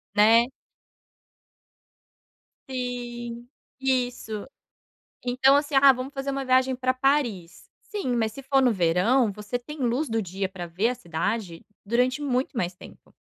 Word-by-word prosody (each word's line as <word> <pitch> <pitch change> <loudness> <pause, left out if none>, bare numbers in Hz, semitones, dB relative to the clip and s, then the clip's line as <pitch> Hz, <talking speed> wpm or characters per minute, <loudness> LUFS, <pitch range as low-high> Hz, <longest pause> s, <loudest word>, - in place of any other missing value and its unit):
Né. 225 +3 +6 2.2
Sim, 240 -2 -5 0.3
isso. 245 -5 -2 0.8
Então, 255 +2 +4
assim: 290 +1 0
"Ah, 270 0 +8
vamos 260 +2 -5
fazer 270 -1 -4
uma 275 0 -3
viagem 260 0 +3
pra 255 0 0
Paris". 255 - -1
Sim, 390 - -3
mas 220 -2 0
se 275 +4 -10
for 270 0 +3
no 250 -2 +4
verão 200 +6 +2
você 210 +4 -4
tem 300 +5 -10
luz 255 +4 0
do 225 -2 0
dia 190 +1 -3
pra 185 -2 -7
ver 185 +7 0
a 250 - -2
cidade 175 -2 -3 0.2
durante 250 +6 +1
muito 260 -1 -1
mais 180 -5 -2
tempo. - - -15
245 Hz, 140 wpm, -25 LUFS, 210-265 Hz, 2.2 s, Ah